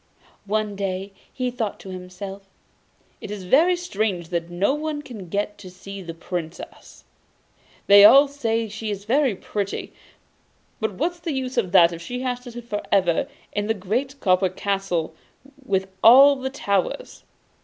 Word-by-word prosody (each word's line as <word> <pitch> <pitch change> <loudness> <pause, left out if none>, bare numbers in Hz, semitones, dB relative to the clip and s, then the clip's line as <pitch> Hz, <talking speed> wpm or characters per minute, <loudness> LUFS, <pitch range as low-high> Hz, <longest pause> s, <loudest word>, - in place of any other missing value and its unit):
One 210 0 -1
day 195 0 -4 0.2
he 250 -1 -2
thought 225 -4 -3
to 190 - -10
himself: 185 +2 -8 0.8
'It - - -7
is 205 -2 -6
very 320 - +4
strange 205 - -2
that 170 -1 -2
no 185 +8 +1
one 300 0 -3
can 210 -10 -9
get 205 +2 -2
to 190 -2 -10
see 195 +2 -9
the 165 -2 -8
Princess. 170 -1 -7 0.8
They 200 0 +8
all 275 +7 +9
say 230 -5 -1
she 215 +1 -6
is 200 -1 -5
very 260 -1 +2
pretty, 200 +1 -4 0.9
but 220 -3 -1
what's 345 - -2
the 335 -3 -3
use 260 -1 -3
of 210 -8 0
that 170 -2 +6
if 170 - -8
she 245 +8 -5
has 250 -1 -2
to 250 -1 -11
sit 240 0 -9
for 205 -2 -3
ever 185 +3 +2 0.3
in 205 0 -1
the 220 - +1
great 250 +9 -3
copper 185 -1 +3
castle 185 -4 -2 0.5
with 190 -5 0 0.2
all 275 +5 +9
the 265 0 -4
towers? 205 - -2
205 Hz, 165 wpm, -23 LUFS, 185-255 Hz, 0.9 s, all